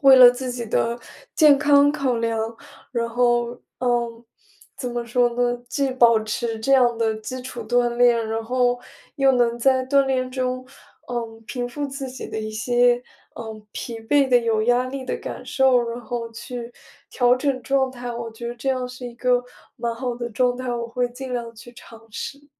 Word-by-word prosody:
为 270 -1 +8
了 250 -1 +10
自 255 +1 -4
己 245 -1 -4
的 235 +2 0 0.4
健 295 -3 +6
康 290 0 +5
考 270 -5 0
量， 225 0 -2 0.4
然 235 -1 0
后， 240 0 +2 0.3
嗯， 240 -1 -1 0.5
怎 250 -2 -3
么 240 0 -3
说 240 +1 +2
呢？ 245 0 0
既 270 +2 0
保 235 -3 +5
持 225 +1 -3
这 275 +5 0
样 245 -3 +5
的 225 -1 +1
基 250 +4 -6
础 255 - -6
锻 245 0 +3
炼， 235 -2 +4
然 225 0 -2
后 245 +1 +1 0.4
又 270 -1 +4
能 240 -1 +2
在 260 +1 +3
锻 275 0 +3
炼 255 -1 0
中， 255 0 -2 0.5
嗯， 225 -1 -5
平 245 -2 -3
复 290 +3 -4
自 275 -1 -6
己 255 0 -8
的 - - -4
一 215 - -4
些， 245 +2 +2 0.3
嗯， 220 -2 -8
疲 230 -2 -6
惫 275 +4 +2
的、 250 - +5
有 225 -2 +1
压 245 +1 +3
力 265 +1 -5
的 - - -2
感 - - -7
受， 265 -3 +3
然 235 +1 -4
后 235 -1 -5
去 235 +1 -7 0.4
调 245 -1 +4
整 255 -1 -1
状 265 +1 +1
态。 245 -1 -6
我 235 -1 -5
觉 235 +2 -8
得 240 - -5
这 245 +3 -4
样 255 -1 0
是 250 0 -8
一 235 - -9
个 250 0 +2 0.3
蛮 235 -1 -2
好 245 0 -3
的 240 0 -4
状 245 +2 +1
态， 255 -1 -4
我 235 -1 -2
会 245 +1 -1
尽 255 +1 -7
量 235 -1 -4
去 240 +2 -13
尝 230 -1 -15
试。 280 +6 -7
245 Hz, 210 characters per minute, -23 LUFS, 235-255 Hz, 0.5 s, 了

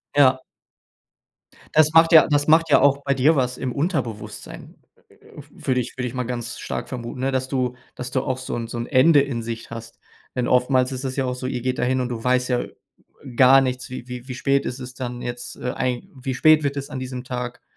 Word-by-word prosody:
Ja. 130 -2 +5 1.3
Das 155 0 +4
macht 165 +1 +6
ja 160 -2 +8
das 145 -1 +1
macht 160 +1 +4
ja 145 - +5
auch 140 0 +3
bei 140 - +1
dir 145 +5 +3
was 125 -2 0
im 130 -1 -3
Unterbewusstsein, 140 - -4 0.3
äh, - - -22 0.2
w - - -9 0.2
würde 130 -1 +2
ich 125 - -4
würde 125 -1 -2
ich 120 - -7
mal 125 -1 -2
ganz 120 -1 -5
stark - - -5
vermuten, 120 -1 -6
ne? 135 +1 0
Dass 130 0 -1
du 130 -2 -1 0.2
dass 125 0 -6
du 130 - +1
auch 130 - -2
so 130 - -5
'n 115 -1 -4
so 120 - -6
'n 120 - -4
Ende 145 +2 +5
in 135 -4 -3
Sicht 115 0 -6
hast, 115 0 -9 0.4
denn 125 -1 0
oftmals 125 +1 +2
ist 130 +1 -5
das 130 0 -3
ja 135 - 0
auch 125 0 -2
so, 130 0 -5
ihr 125 -2 -3
geht 130 +1 -2
dahin 130 +1 +1
und 125 - -2
du 115 -2 -4
weißt 125 0 +1
ja, 125 - +1
äh, - - -9 0.6
gar 130 +1 +7
nichts. 130 -1 -3
Wie 125 -1 -7
wie 125 0 -8
wie 130 - -5
spät 140 +1 +1
ist 125 - -4
es 125 0 -8
dann 125 -2 -6
jetzt, 120 0 -6
äh, 125 - -3
eig 125 -2 -1
wie 130 0 -4
spät 155 +3 +5
wird 140 0 -1
es 140 - -5
an 130 - -5
diesem 130 -1 -6
Tag. 125 -1 -5
130 Hz, 240 wpm, -22 LUFS, 125-135 Hz, 1.3 s, ja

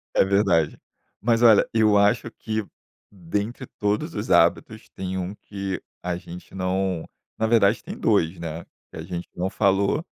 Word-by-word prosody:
É - - +5
verdade. 95 -6 +2 0.4
Mas 115 0 +2
olha, 110 -4 +7
eu 110 -2 +4
acho 105 +4 +3
que 110 -1 -3 0.5
dentre 105 +7 -4
todos 105 0 -1
os - - -4
hábitos - - +2
tem 95 0 -5
um 95 +2 -3
que 100 -2 -5 0.2
a 90 -1 -2
gente 90 +1 -11
não 95 -2 -1 0.3
na 110 - +1
verdade 110 -2 +3
tem 200 +8 -8
2, 90 - +2
né? 85 0 -6 0.3
Que - - -10
a - - -5
gente 85 0 -6
não 90 +2 -1
falou, 100 - +1
100 Hz, 160 wpm, -24 LUFS, 90-110 Hz, 0.5 s, olha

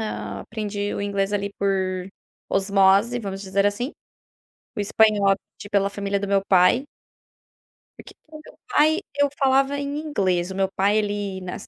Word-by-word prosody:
ah, 105 -2 -5
aprendi 205 - -4
o - - -3
inglês 200 -1 -1
ali 200 0 -2
por 190 -2 -1 0.4
osmose, 195 +4 +3
vamos 195 -3 -6
dizer 195 +1 +1
assim. 230 +7 -2 0.8
O - - -2
espanhol, 205 -1 +3 0.2
di 205 - -8
pela 200 -1 +2
família 200 0 -2
do 200 - -4
meu 195 0 +1
pai. 190 +8 +4 1.1
Porque - - -13
com 310 0 -11
o - - -13
meu - - -15
pai 315 -4 +3 0.2
eu 285 0 +3
falava 270 +1 +3
em 285 +1 -3
inglês. 190 - -1
O - - -6
meu 195 0 +1
pai, 205 +3 +3
ele 205 -2 -3
nas 180 -1 -7
200 Hz, 165 wpm, -23 LUFS, 195-220 Hz, 1.1 s, pai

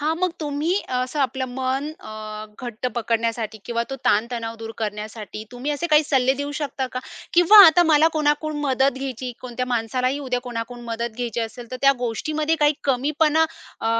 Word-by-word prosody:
हां, 310 +2 +1
मग 365 0 +1
तुम्ही 300 +3 -1 0.2
असं 255 +4 -1
आपलं 265 0 0
मन 265 +2 -1
अ, 215 0 -7 0.2
घट्ट 240 +1 -4
पकडण्यासाठी 230 -1 -1
किंवा 235 -1 -1
तो 270 - -3
ताण-तणाव 230 +1 +1
दूर 225 0 -6
करण्यासाठी, 215 0 -5
तुम्ही 250 +4 -3
असे 295 +4 -1
काही 305 -1 +5
सल्ले 265 -1 +3
देऊ 285 0 -3
शकता 275 -3 -2
का? 255 - -2 0.4
किंवा 355 +5 +8
आता 350 +2 +6
मला 310 +1 +6
कोणाकडून 300 0 0
मदत 265 -1 +1
घ्यायची, 255 -2 -4
कोणत्या 250 0 -4
माणसालाही 250 +3 0
उद्या 250 -1 0
कोणाकडून 240 0 -6
मदत 230 0 -4
घ्यायची 240 -1 -2
असेल, 230 +1 -6
तर 255 - -4
त्या 275 0 +7
गोष्टीमध्ये 300 +7 -1
काही 295 0 +4
कमीपणा 300 +4 +2 0.4
अ, - - -2
255 Hz, 170 wpm, -23 LUFS, 230-295 Hz, 0.4 s, किंवा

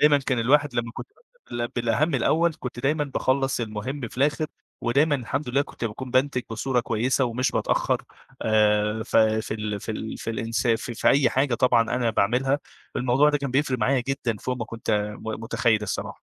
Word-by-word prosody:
دايمًا 150 -1 +6
كان 130 -2 -1
الواحد 140 +3 +3
لمّا 115 -1 -2
كنت - - -7 0.4
بابدأ 120 0 -2
بال - - -17
بالأهم 120 +7 +1
الأول 160 +6 +2
كنت 120 -1 -5
دايمًا 150 +3 +1
باخلص 135 -1 0
المهم 115 +4 -4
في - - -15
الآخر 150 +3 +2 0.3
ودايمًا 145 +6 +2
الحمد 135 +1 -3
لله 140 +3 +2
كنت 120 - -8
باكون 120 +4 -5
بانتِج 130 0 +2
بصورة 125 +2 0
كويسة 120 +4 +1
ومش 125 +2 0
باتأخر، - - 0 0.4
آآ 105 0 +2
ف 110 - -2
في 110 0 +2
ال 105 -2 -3
في - - -5
ال 110 +1 -5
في 115 - -4
الإنسا 115 +1 0
ف - - -12
في 115 - +1
أي 135 -2 +4
حاجة 135 -2 +1
طبعًا 120 -1 +4
أنا 115 0 0
باعملها، 125 +7 +1 0.4
الموضوع 130 +4 +3
ده 145 - +1
كان 140 -2 -3
بيفرق 135 -1 +1
معايا 130 +4 +2
جدًا 125 -5 -1
فوق 125 +4 -3
ما 115 - -3
كنت 115 0 -5 0.3
م - - -13 0.2
متخيّل 115 -2 +1
الصراحة. 105 - -4
125 Hz, 190 wpm, -25 LUFS, 115-135 Hz, 0.4 s, دايمًا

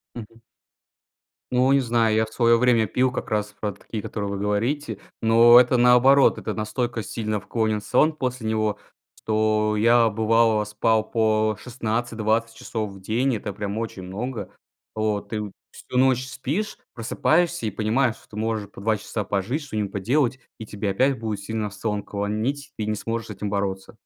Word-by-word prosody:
Мгм. 115 0 -10 1.1
Ну, 125 +2 +3
не 140 - +5
знаю, 115 -3 +2
я 110 0 +3
в - - -13
своё 115 -1 +4
время 120 -3 +4
пил 125 +5 +1
как 125 - -5
раз 105 -1 -1
про 105 -1 -2
такие, 105 +2 -7
которые 100 -2 -4
вы 100 - -3
говорите, 115 +9 -1 0.2
но 115 +2 +8
это 125 0 +3
наоборот, 125 +3 +5
это - - -4
настолько 115 +2 -2
сильно 105 0 -3
вклонен 110 +1 -1
сон 155 +9 +2
после 125 -5 -3
него, 110 -1 0 0.4
что 110 0 +1
я 115 +1 +4
бывало 110 0 +2
спал 110 +1 +1
по 110 -2 +1
16-20 115 -1 -2
часов 110 -2 -4
в 95 -1 -13
день. 120 +5 0
Это 105 0 -4
прям 105 +2 -4
очень 105 -5 -5
много 110 +5 -5 0.4
вот. 110 0 -2
И 110 - -1 0.3
всю 125 - -6
ночь 130 0 +3
спишь, 150 +11 -3 0.2
просыпаешься 160 +6 +1
и 105 - -1
понимаешь, 115 +3 +1
что - - -23
ты 105 - -12
можешь 110 -2 -2
по - - -13
2 110 0 +1
часа 105 +1 -4
пожить, 105 - -2
что-нибудь 105 -7 -3
поделать, 125 +6 0 0.2
и 110 - -8
тебе 100 -1 -3
опять 130 +6 +2
будет 110 -3 -3
сильно 105 +1 -3
в - - -14
сон 105 0 -3
клонить, 110 +8 -3
ты 105 - -2
не 105 0 -1
сможешь 115 +2 -4
с - - -7
этим 100 +1 -4
бороться. 100 +1 -3
110 Hz, 175 wpm, -24 LUFS, 105-120 Hz, 1.1 s, но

